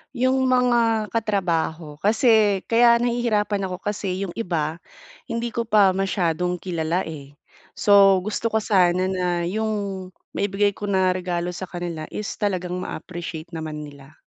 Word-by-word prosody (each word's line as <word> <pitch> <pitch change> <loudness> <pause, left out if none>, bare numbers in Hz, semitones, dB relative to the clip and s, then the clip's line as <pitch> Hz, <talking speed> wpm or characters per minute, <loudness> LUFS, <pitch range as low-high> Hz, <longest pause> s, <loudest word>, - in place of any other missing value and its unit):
'Yung 260 +2 +2
mga 235 -4 +2
katrabaho, 170 -8 -1
kasi 215 -2 +3
kaya 235 0 +5
nahihirapan 225 -5 0
ako 185 - -4
kasi 200 -2 -2
'yung 180 - -4
iba, 165 -5 -2 0.5
hindi 230 0 -3
ko 230 0 -3
pa 205 -3 +5
masyadong 180 -2 0
kilala 170 0 -1
eh. 145 -3 -9 0.4
So 195 -2 +5
gusto 215 +3 -2
ko 220 -1 0
sana 185 -3 +3
na 180 -2 -1
'yung 200 -1 -2 0.2
maibigay 200 0 +1
ko 205 +1 -7
na 190 -2 +2
regalo 180 -1 -2
sa 185 +1 -6
kanila 170 -3 -5
is 210 - -5
talagang 180 -3 -1
ma-appreciate 170 -3 -7
naman 155 -2 -5
nila. 145 0 -13
190 Hz, 140 wpm, -23 LUFS, 175-215 Hz, 0.5 s, kaya